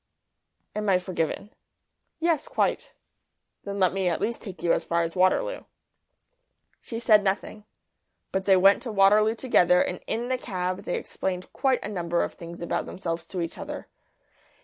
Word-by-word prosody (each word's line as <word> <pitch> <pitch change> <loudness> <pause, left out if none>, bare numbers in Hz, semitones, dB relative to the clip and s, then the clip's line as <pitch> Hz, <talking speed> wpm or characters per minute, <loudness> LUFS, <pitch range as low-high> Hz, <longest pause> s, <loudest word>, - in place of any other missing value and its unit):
"Am 210 -1 -1
I 185 - +5
forgiven?" 180 +2 -3 0.7
"Yes; 335 - +1
quite." - - -1 0.7
"Then 200 0 -5
let 185 -2 +3
me 190 -1 0
at 170 - -1
least 235 +1 -2
take 190 -4 -9
you 170 - +3
as - - +1
far 170 0 +1
as 165 0 -4
Waterloo." - - +1 1.2
She 230 - -6
said 215 -3 +5
nothing. 205 +2 -2 0.7
But 190 0 -1
they 195 -2 +6
went 195 +2 +5
to 240 - -5
Waterloo 210 +2 +5
together, 180 -8 +4
and 180 - 0
in 235 +2 -2
the 255 0 -1
cab 185 -5 -3
they - - -1
explained 185 -1 -4
quite 265 -2 +1
a - - -3
number 175 -4 -1
of - - -4
things 170 0 -9
about - - -2
themselves 170 -2 -4
to 180 0 -4
each 165 - -5
other. - - -6
195 Hz, 170 wpm, -26 LUFS, 180-220 Hz, 1.2 s, they